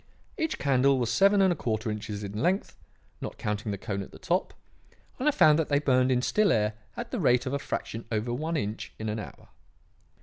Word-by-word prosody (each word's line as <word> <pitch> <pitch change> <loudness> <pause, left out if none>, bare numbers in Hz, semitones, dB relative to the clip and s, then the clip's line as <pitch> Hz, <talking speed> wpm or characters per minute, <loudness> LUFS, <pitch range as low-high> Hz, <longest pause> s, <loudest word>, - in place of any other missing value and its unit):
Each 320 -4 -1
candle 135 0 +3
was 120 -2 0
seven 195 - +5
and 190 -2 +4
a - - -6
quarter 110 -5 -2
inches 105 -1 -5
in 100 - -5
length, 190 +3 0 0.5
not - - -6
counting 105 0 -2
the 100 - -3
cone 100 -1 -4
at 95 - -8
the - - -12
top, - - 0 0.7
and 265 - 0
I - - +6
found 155 - +5
that 160 - +1
they 145 - +3
burned 130 -3 +3
in 125 -1 +2
still 210 +6 +3
air 105 0 +2 0.2
at - - -5
the - - -2
rate 125 +1 +3
of 130 - -3
a 140 - 0
fraction 115 -4 -4
over 110 +2 -1
one 160 +6 -2
inch 105 -5 -4
in 110 0 -4
an 110 +1 -2
hour. - - -10
125 Hz, 225 wpm, -28 LUFS, 110-155 Hz, 0.7 s, I